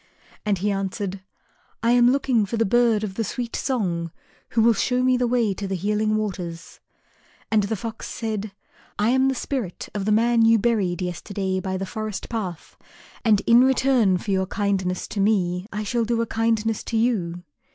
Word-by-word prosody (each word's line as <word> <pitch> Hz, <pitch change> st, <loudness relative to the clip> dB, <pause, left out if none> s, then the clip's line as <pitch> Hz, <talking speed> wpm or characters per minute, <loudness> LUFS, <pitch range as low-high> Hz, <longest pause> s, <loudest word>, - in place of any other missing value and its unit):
And 205 Hz, -2 st, +2 dB
he 205 Hz, +3 st, 0 dB
answered, 195 Hz, 0 st, -3 dB, 0.6 s
"I 230 Hz, -, +3 dB
am 245 Hz, 0 st, +5 dB
looking 260 Hz, -4 st, +2 dB
for 230 Hz, -, -3 dB
the 225 Hz, -, +2 dB
bird 230 Hz, 0 st, +3 dB
of 200 Hz, -3 st, -3 dB
the 225 Hz, -, -2 dB
sweet 235 Hz, +3 st, -4 dB
song, 180 Hz, -10 st, -1 dB, 0.4 s
who 225 Hz, -, +2 dB
will 230 Hz, 0 st, +6 dB
show 250 Hz, +4 st, 0 dB
me 255 Hz, 0 st, +4 dB
the 250 Hz, -1 st, +1 dB
way 235 Hz, -4 st, +1 dB
to 195 Hz, +1 st, -5 dB
the 190 Hz, -, -2 dB
Healing 210 Hz, +3 st, 0 dB
Waters." 180 Hz, -5 st, -4 dB, 0.7 s
And 215 Hz, -1 st, +4 dB
the 205 Hz, +2 st, -1 dB
Fox 225 Hz, +2 st, -6 dB
said, 215 Hz, -2 st, -4 dB, 0.5 s
"I 210 Hz, +2 st, +2 dB
am 260 Hz, +1 st, +3 dB
the 265 Hz, -, +1 dB
spirit 245 Hz, -8 st, -4 dB
of 200 Hz, -2 st, -3 dB
the 215 Hz, -, +1 dB
man 230 Hz, +2 st, +4 dB
you 225 Hz, 0 st, +6 dB
buried 195 Hz, -5 st, 0 dB
yesterday 185 Hz, +2 st, -3 dB
by 190 Hz, 0 st, -3 dB
the 195 Hz, -, -3 dB
forest 215 Hz, +1 st, -5 dB
path, 195 Hz, -8 st, -5 dB, 0.5 s
and 215 Hz, -3 st, +4 dB
in 235 Hz, +3 st, +6 dB
return 260 Hz, -7 st, +3 dB
for 200 Hz, +3 st, -4 dB
your 190 Hz, -1 st, +1 dB
kindness 190 Hz, -3 st, -1 dB
to 210 Hz, -, -4 dB
me 190 Hz, -3 st, +1 dB
I 210 Hz, +1 st, -3 dB
shall 235 Hz, +3 st, 0 dB
do 230 Hz, 0 st, 0 dB
a -, -, -2 dB
kindness 225 Hz, -1 st, 0 dB
to 230 Hz, -, -1 dB
you. 180 Hz, -7 st, 0 dB
215 Hz, 190 wpm, -23 LUFS, 190-235 Hz, 0.7 s, will